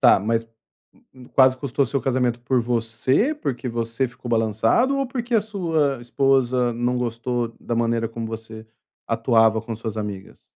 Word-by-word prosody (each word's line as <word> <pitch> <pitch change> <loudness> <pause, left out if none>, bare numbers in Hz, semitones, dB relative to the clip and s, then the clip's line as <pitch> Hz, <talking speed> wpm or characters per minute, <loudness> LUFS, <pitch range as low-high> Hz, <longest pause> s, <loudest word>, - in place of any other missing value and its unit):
Tá, - - +6
mas 115 +2 0 0.9
quase 130 -1 +6
custou 140 0 0
seu 140 +3 -1
casamento 125 -2 0
por 125 +1 +1
você, 120 - +1
porque 135 - -4
você 115 +2 -1
ficou 125 0 -9
balançado, 115 - +2
ou 275 - 0
porque 245 -1 -3
a 225 - +5
sua 160 - 0
esposa 125 -1 +2
não 120 +2 -1
gostou 120 0 -2
da 120 - -3
maneira 115 -1 +1
como 115 0 -5
você 110 0 -8 0.4
atuava 115 -1 +3
com 115 0 -5
suas 110 -1 -5
amigas? 105 -3 -6
120 Hz, 155 wpm, -23 LUFS, 115-135 Hz, 0.9 s, Tá